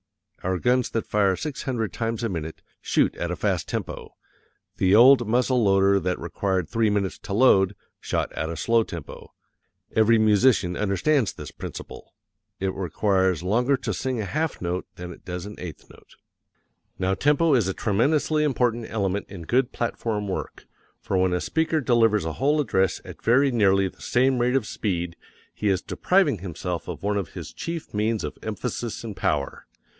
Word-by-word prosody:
Our 95 +1 -1
guns 125 +5 +1
that 115 - -2
fire 100 -3 +2
six 150 - -5
hundred 115 -5 -2
times 115 0 -2
a 115 - 0
minute, 80 -3 -5 0.2
shoot - - +1
at - - -3
a - - -2
fast - - -1
tempo; - - -5 0.6
the 95 +1 +4
old 125 +1 +7
muzzle 125 +1 +2
loader 100 0 +4
that 90 -1 -1
required 95 0 -1
three 115 +2 +1
minutes 100 -2 -1
to 100 - -6
load, 100 -4 +4 0.2
shot - - -2
at 80 - -3
a 85 - -5
slow 115 +8 +3
tempo. 85 -8 -8 0.6
Every 110 +1 +5
musician 110 -3 +3
understands 105 - +1
this - - -9
principle: - - -9 0.4
it 95 0 -1
requires 95 -1 0
longer 120 +8 +2
to 125 -4 -3
sing 125 +6 -2
a 105 - -2
half 155 +8 -2
note 90 +1 -3
than 90 0 -7
it - - -17
does 90 0 -5
an 105 - -9
eighth 85 -4 -8
note. - - -19 0.8
Now 95 0 0
tempo 150 +7 +3
is 115 -7 +3
a 95 - -1
tremendously 150 +8 +1
important 120 -5 0
element 100 -2 -1
in 95 -4 -8
good 125 +8 +1
platform 110 -3 -2
work, 95 - -5 0.3
for - - -3
when 90 -1 +2
a 90 - +1
speaker 160 - 0
delivers 115 - +3
a 80 - -2
whole 145 - +1
address 95 -9 +1
at - - -10
very 135 +4 +4
nearly 95 -4 +3
the - - -13
same 130 +1 +2
rate 125 +2 +2
of 130 -5 +1
speed 90 -5 -3 0.4
he 105 - -1
is 95 -2 +1
depriving 180 - +2
himself 90 -1 -5
of 85 -2 -6
one 105 0 0
of 95 -4 -4
his - - -7
chief 165 -1 -6
means 110 +1 0
of - - -6
emphasis 115 +2 -4
and 110 -3 -6
power. 70 -6 -2
105 Hz, 180 wpm, -25 LUFS, 95-125 Hz, 0.8 s, old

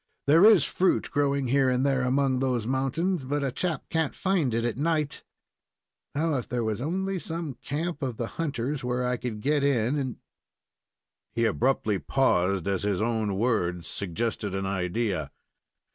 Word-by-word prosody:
There 160 +5 +6
is 210 -8 +8
fruit 185 0 +1
growing 140 -3 +1
here 135 0 +3
and 125 +1 +1
there 135 -2 +2
among 130 +1 +2
those 125 -4 0
mountains, 135 +7 0
but 145 +2 -1
a 135 - 0
chap 165 +1 -2
can't 160 -3 0
find 185 -9 +1
it 115 0 0
at 120 - -1
night. 150 +1 -1 0.9
Now, 155 0 +1
if 125 - -5
there 120 -1 -1
was 110 0 -2
only 190 +6 -1
some 165 -3 -4
camp 150 +5 -4
of 130 -5 -3
the 120 - -2
hunters, 140 -1 -3
where 125 0 -1
I 125 0 0
could 115 -3 -5
get 145 +2 +1
in 135 -1 +2
and 130 -4 -3 0.6
" - - -60
He 115 - +2
abruptly 110 -2 +1
paused, 95 - +1
as 100 -2 0
his 100 -2 0
own 110 -3 0
words 90 -6 0
suggested 100 +1 -3
an 95 0 -2
idea. 95 - -1
130 Hz, 170 wpm, -27 LUFS, 110-145 Hz, 0.9 s, is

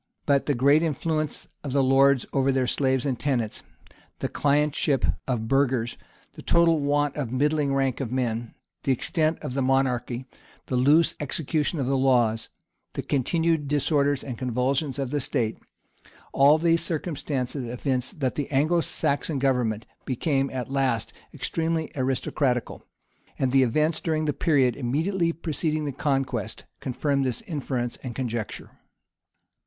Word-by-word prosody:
But 140 -2 +2
the 145 - +2
great 140 +5 +4
influence 155 -1 -1 0.2
of 140 -3 -4
the 140 -1 +3
lords 135 0 +4
over 135 0 +2
their 130 -1 +1
slaves 130 0 +1
and 130 -4 -1
tenants, 120 -7 -1 0.6
the - - -3
clientship 145 - +1 0.2
of 125 -4 0
the - - -5
burghers, 130 -2 +1 0.4
the - - -10
total 170 -2 +3
want 145 0 +1
of 140 -6 -3
a - - -10
middling 145 +1 +1
rank 135 -2 0
of 130 -4 -3
men, 120 -2 -2 0.3
the 135 - 0
extent 155 +5 0
of 145 -4 -4
the 135 - 0
mon 135 +1 +3
archy, 125 0 -3 0.4
the 130 - -2
loose 145 +6 +4
execution 150 +2 -1
of 135 - 0
the 135 +1 +1
laws, 120 -4 +2 0.4
the - - -4
continued 160 +2 +1
disorders 145 -1 +1
and 125 -4 -6
convulsions 130 +3 0
of 135 -2 -3
the 145 -1 0
state, 120 -4 -1 0.7
all 140 +3 +6
these 165 0 +2
circumstances 145 -6 -2
evince 125 +1 -1
that 135 -5 -2
the 145 - -3
Anglo 155 +5 +2
Saxon 145 0 -1
government 125 -5 0 0.2
became 135 +1 0
at 130 0 -5
last 130 -5 0 0.2
extremely 160 -1 -2
aristocratical; 130 -1 -1 0.6
and 130 -1 +1
the 135 0 +5
events, 150 +6 +2
during 155 -2 -1
the 150 - 0
period 135 -8 +2
immediately 165 +7 0
preceding 155 -2 -2
the 145 - -2
conquest, 135 -5 -2
confirm 140 +2 -1
this 125 -3 -1
inference 130 -6 -3
or 130 - -4
conjecture. 120 -2 -4
135 Hz, 150 wpm, -25 LUFS, 125-150 Hz, 0.7 s, all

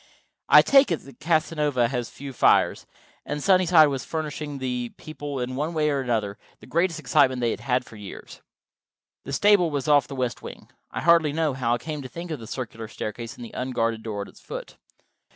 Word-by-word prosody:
I - - +9
take 275 -2 +5
it 140 -4 -5
Casanova 150 -5 +1
has 125 -2 -3
few 140 -1 -9
fires, - - +3 0.4
and 150 - -4
Sunnyside 180 -5 +5
was 135 -3 -3
furnishing 150 -2 -4
the 125 -2 -3
people, 145 -3 -6
in 125 +1 -3
one 155 +5 -2
way 150 -1 +2
and 140 - 0
another, 110 -5 -2 0.2
the - - -14
greatest 170 0 0
excitement 130 -2 +3
they 120 -2 +1
had - - -4
had 125 -1 0
for 110 - -13
years. 100 -2 -10 0.8
The 140 - -6
stable 200 +2 +4
was 140 -4 -3
off 145 -3 +4
the 140 - -7
west 125 -2 -2
wing. - - -10 0.2
I - - -5
hardly 165 -3 +4
know 160 -2 0
how 120 -2 0
I - - -2
came 150 +4 -6
to 130 - -8
think 170 +3 -7
of 155 - -4
the 115 - -10
circular 115 -3 -6
staircase 110 +2 -6
and 120 - -9
the - - -12
unguarded 115 -3 -1
door 105 -3 -4
at - - -12
its - - -18
foot. - - -8
135 Hz, 205 wpm, -25 LUFS, 120-155 Hz, 0.8 s, I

